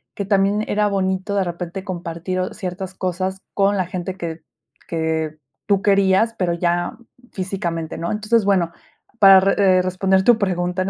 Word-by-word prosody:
que 200 Hz, -, -3 dB
también 200 Hz, +1 st, +2 dB
era 210 Hz, 0 st, +2 dB
bonito 190 Hz, 0 st, -1 dB
de 195 Hz, -, +2 dB
repente 175 Hz, +1 st, -5 dB
compartir, 180 Hz, -1 st, -4 dB
o 185 Hz, -, -2 dB
ciertas 185 Hz, 0 st, -6 dB
cosas 185 Hz, +1 st, -3 dB
con 200 Hz, 0 st, +2 dB
la 185 Hz, -, 0 dB
gente 185 Hz, 0 st, -5 dB
que 165 Hz, -2 st, -6 dB, 0.4 s
que 160 Hz, -1 st, -2 dB, 0.3 s
tú 200 Hz, -2 st, +2 dB
querías, 200 Hz, +2 st, +3 dB
pero 175 Hz, -2 st, +1 dB
ya 175 Hz, 0 st, -1 dB, 0.4 s
físicamente, 175 Hz, -4 st, -4 dB
¿no? 170 Hz, -, -3 dB
Entonces, 215 Hz, 0 st, +1 dB
bueno, 185 Hz, -4 st, +2 dB, 0.5 s
para 195 Hz, -2 st, +9 dB
re 195 Hz, -, +2 dB, 0.2 s
eh, -, -, +3 dB
responder 190 Hz, +1 st, +1 dB
tu 240 Hz, +1 st, +5 dB
pregunta 180 Hz, -3 st, -1 dB
en 190 Hz, -, -3 dB
185 Hz, 165 wpm, -21 LUFS, 175-195 Hz, 0.5 s, para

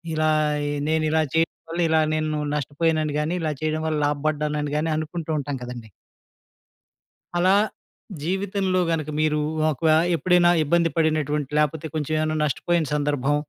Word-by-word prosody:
ఇలా, 155 Hz, 0 st, +2 dB, 0.3 s
ఆహ్, 145 Hz, 0 st, -2 dB, 0.2 s
నేను 160 Hz, 0 st, +1 dB
ఇలా 160 Hz, 0 st, +3 dB
చేయడం 165 Hz, 0 st, +2 dB, 0.2 s
వల్ల 170 Hz, +1 st, -1 dB
ఇలా 160 Hz, 0 st, +4 dB
నేను 155 Hz, -1 st, -1 dB, 0.2 s
నష్టపోయానని, 150 Hz, +1 st, 0 dB
గానీ 160 Hz, +4 st, -1 dB
ఇలా 155 Hz, -1 st, 0 dB
చేయడం 155 Hz, 0 st, -1 dB
వల్ల 155 Hz, -1 st, 0 dB
లాభపడ్డానని 150 Hz, 0 st, -1 dB
గానీ 160 Hz, +1 st, 0 dB
అనుకుంటూ 160 Hz, +1 st, -4 dB
ఉంటాం 145 Hz, -1 st, -4 dB
కదండీ. 120 Hz, -3 st, -8 dB, 1.5 s
అలా, 185 Hz, +3 st, +4 dB, 0.7 s
జీవితంలో 190 Hz, +1 st, 0 dB
గనక 155 Hz, -2 st, -1 dB
మీరు 155 Hz, -1 st, +2 dB, 0.3 s
ఒక 145 Hz, -5 st, -3 dB
వ -, -, +5 dB, 0.3 s
ఎప్పుడైనా, 175 Hz, 0 st, +4 dB
ఇబ్బంది 170 Hz, +2 st, +2 dB
పడినటువంటి, 150 Hz, -3 st, 0 dB
లేకపోతే 150 Hz, +1 st, 0 dB
కొంచెం 155 Hz, 0 st, -2 dB
ఏమైనా 155 Hz, 0 st, 0 dB
నష్టపోయిన 165 Hz, +3 st, 0 dB
సందర్భం, 145 Hz, -1 st, 0 dB
155 Hz, 140 wpm, -23 LUFS, 150-165 Hz, 1.5 s, వ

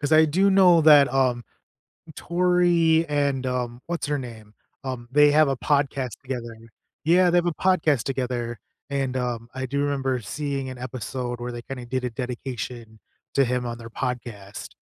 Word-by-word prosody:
'cause 145 Hz, +1 st, -1 dB
I 155 Hz, 0 st, +7 dB
do 185 Hz, +6 st, +2 dB
know 185 Hz, -3 st, +6 dB
that 145 Hz, -4 st, +7 dB
um, 125 Hz, -3 st, +1 dB, 0.7 s
Tori, 170 Hz, -2 st, +2 dB
and, 140 Hz, -3 st, 0 dB
um, 125 Hz, -1 st, -3 dB
what's 170 Hz, -2 st, -3 dB
her 145 Hz, -1 st, -1 dB
name? 110 Hz, -4 st, -10 dB, 0.3 s
Um, 125 Hz, -2 st, -5 dB
they 150 Hz, +1 st, +5 dB
have 155 Hz, -1 st, +5 dB
a 135 Hz, -, 0 dB
podcast 140 Hz, -4 st, -1 dB
together. 120 Hz, -3 st, -5 dB, 0.5 s
Yeah, 175 Hz, +2 st, +4 dB
they 175 Hz, -, +4 dB
have 175 Hz, -, 0 dB
a 175 Hz, -, +1 dB
podcast 160 Hz, -9 st, +2 dB
together 125 Hz, -3 st, -3 dB, 0.3 s
and, 135 Hz, -2 st, -1 dB
um, 120 Hz, -2 st, -3 dB
I 130 Hz, 0 st, -3 dB
do 140 Hz, +2 st, -1 dB
remember 135 Hz, -3 st, -1 dB
seeing 135 Hz, +4 st, -4 dB
an 130 Hz, -, -8 dB
episode 125 Hz, 0 st, -5 dB
where 120 Hz, 0 st, -4 dB
they 120 Hz, -, -6 dB
kind 135 Hz, +1 st, -7 dB
of 120 Hz, -, -10 dB
did 130 Hz, -1 st, -1 dB
a 125 Hz, -, -1 dB
dedication 120 Hz, -2 st, -6 dB, 0.4 s
to 140 Hz, -, +4 dB
him 125 Hz, 0 st, -1 dB
on 120 Hz, 0 st, -4 dB
their 115 Hz, 0 st, -10 dB
podcast. 120 Hz, -6 st, -5 dB
130 Hz, 180 wpm, -24 LUFS, 120-150 Hz, 0.7 s, I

